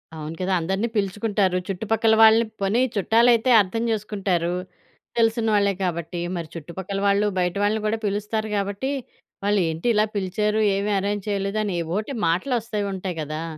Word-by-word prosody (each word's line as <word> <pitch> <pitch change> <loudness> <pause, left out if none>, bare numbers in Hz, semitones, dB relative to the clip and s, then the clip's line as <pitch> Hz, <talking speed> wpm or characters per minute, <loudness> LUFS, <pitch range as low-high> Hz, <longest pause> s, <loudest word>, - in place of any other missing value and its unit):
అవును 155 +1 -6
కదా! 185 +1 0
అందరిని 190 +7 -1
పిలుచుకుంటారు. 200 -1 0
చుట్టుపక్కల 220 +3 +1
వాళ్ళని 225 +1 +7 0.2
పోనీ 205 +6 +2
చుట్టాలైతే 230 +4 +3
అర్థం 225 +4 -2
చేసుకుంటారు. 195 -5 -1 0.6
తెలిసిన 225 0 +2
వాళ్ళే 200 -1 +3
కాబట్టి. 170 -1 -3 0.2
మరి 165 -2 -5
చుట్టుపక్కల 185 +5 -5
వాళ్ళు, 200 +1 +3
బయట 180 +1 0
వాళ్ళని 215 +1 +1
గూడా 220 +1 0
పిలుస్తారు 210 +2 -2
గాబట్టి, 200 +7 -2 0.5
వాళ్ళేంటి 175 -2 0
ఇలా 210 +1 +4
పిలిచారు, 210 +3 0
ఏమి 205 +1 -1
అరేంజ్ 205 +1 -3
చేయలేదు 200 +1 -1
అని 195 - -2
ఏవోటి 205 - -3
మాటలొస్తూంటాయి 200 -2 -2
గదా! 155 +2 -5
200 Hz, 135 wpm, -23 LUFS, 185-220 Hz, 0.6 s, వాళ్ళని